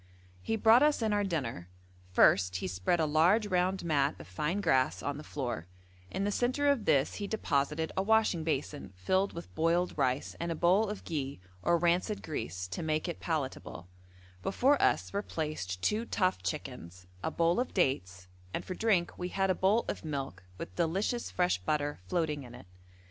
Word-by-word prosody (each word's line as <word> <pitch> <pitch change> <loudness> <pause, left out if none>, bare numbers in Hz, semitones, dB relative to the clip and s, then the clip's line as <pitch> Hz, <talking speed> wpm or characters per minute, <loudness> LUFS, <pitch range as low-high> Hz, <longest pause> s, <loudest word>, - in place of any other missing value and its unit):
He 225 - -1
brought 225 +2 +6
us 295 -5 +3
in 215 -1 +1
our 205 0 +2
dinner: 130 - -3 0.4
first 90 0 +4
he 95 - -2
spread 90 - 0
a 160 - +3
large 170 +9 +4
round 185 -1 0
mat 145 -4 +2
of 75 - -10
fine 150 - -2
grass 130 -10 +2
on 145 0 -2
the 150 - -8
floor; 120 - -4 0.4
in 195 - -2
the 205 - 0
centre 255 +6 +1
of 265 -7 +1
this 145 -4 +2
he 205 - -3
deposited 155 -6 0
a - - +1
washing 215 -5 +2
basin 145 - -3
filled 190 - +1
with 170 - -9
boiled 170 +3 +1
rice 130 -2 0
and 170 0 -2
a - - -1
bowl 185 +6 +3
of 210 - -6
ghi 140 - -4 0.2
or 170 - +3
rancid 175 +5 +1
grease 90 - -4
to 95 - -4
make 155 +1 -1
it 170 - -4
palatable; 130 - -4 0.5
before 270 - +2
us - - +2
were 200 - 0
placed 150 - -4
two 220 +2 +1
tough 185 -4 0
chickens, 95 - -6 0.2
a - - -1
bowl 170 +4 +2
of 250 - -1
dates, 95 - 0 0.3
and - - -4
for 185 - -4
drink 185 -4 +1
we 180 0 -3
had 195 0 +1
a - - +3
bowl 200 +6 +2
of - - -4
milk 135 - -4 0.2
with 90 - -7
delicious 195 +8 0
fresh 180 - +1
butter 145 +9 -1
floating 155 - -1
in 125 -2 -11
it. 125 - -12
165 Hz, 185 wpm, -31 LUFS, 135-195 Hz, 0.5 s, brought